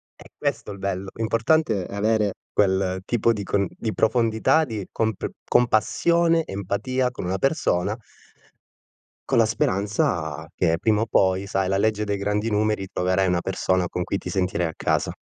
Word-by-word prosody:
È - - -16
questo - - -2
è - - -5
il 100 - -11
bello. 95 0 -3
L'importante 115 - +1
è - - -9
avere 105 0 +1 0.2
quel 95 -2 +1
tipo 115 0 +2
di 105 -2 -4
con 100 0 0
di 110 -2 -4
profondità, 115 +6 +2
di 110 -6 -5
compr 110 -3 -1 0.2
compassione, 165 +8 +3
empatia 105 +7 -1
con 120 - -6
una 95 +2 -1
persona 105 - 0 1.3
con - - +2
la 115 - +6
speranza 95 -7 -1
che 80 0 +2
prima 110 +1 +2
o - - +1
poi, 95 -3 +2
sai 95 -1 -1
la 95 +1 +1
legge 105 +1 +1
dei 100 -1 -1
grandi 105 +2 -1
numeri, 105 -2 0
troverai 95 +1 +1
una 90 -1 +1
persona 95 -1 0
con 90 - -4
cui 100 - -2
ti - - -9
sentirai 95 -2 0
a 80 - -3
casa. - - 0
100 Hz, 170 wpm, -24 LUFS, 95-115 Hz, 1.3 s, la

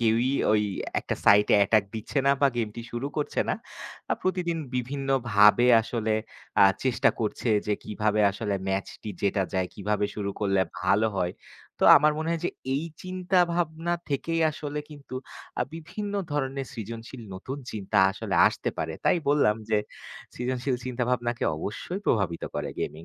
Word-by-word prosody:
কেউই 115 +2 +2 0.2
ওই 105 -1 +3 0.4
একটা - - -3
সাইটে 105 +1 +6
অ্যাটাক 100 +1 +4
দিচ্ছে 110 +6 -3
না 140 - +6
বা 140 - +5
গেমটি 115 0 -3
শুরু 120 +4 -3
করছে 150 - -1
না। - - +2 0.6
আ - - +4
প্রতিদিন 180 -3 0 0.2
বিভিন্নভাবে 125 -4 +3 0.2
আসলে 110 -2 -2 0.5
আ - - +9 0.2
চেষ্টা 130 -2 +3
করছে। 110 +2 -2 0.2
যে 105 - +2
কীভাবে 105 0 0
আসলে 100 0 -3
ম্যাচটি 95 +2 -3
জেতা 100 -1 +2
যায়। 95 -1 0
কীভাবে 105 +1 -1
শুরু 100 -1 -2
করলে 95 -2 +2 0.2
ভালো 100 +4 +3
হয়। 90 -1 0 0.5
তো - - -5
আমার 150 0 +4
মনে 160 - -2
হয় 170 -1 -1
যে - - -1 0.2
এই 145 +4 -1 0.2
চিন্তাভাবনা 175 -2 0 0.2
থেকেই 165 +4 -1
আসলে 150 -1 -5
কিন্তু 140 -3 -10 0.5
আ - - +4
বিভিন্ন 195 +6 -6 0.2
ধরনের 135 -1 -2
সৃজনশীল 115 +1 -7
নতুন 130 +9 -6
চিন্তা 105 0 -1
আসলে - - -4
আসতে - - -3
পারে 80 0 -2
তাই - - +4
বললাম। 140 -7 +4
যে 105 - +4 0.6
সৃজনশীল 125 +1 -1
চিন্তাভাবনাকে 120 -1 -1
অবশ্যই 175 - -5
প্রভাবিত 95 -7 +1
করে - - -3
গেমিং। 80 +2 -4
120 Hz, 150 wpm, -27 LUFS, 105-145 Hz, 0.6 s, আ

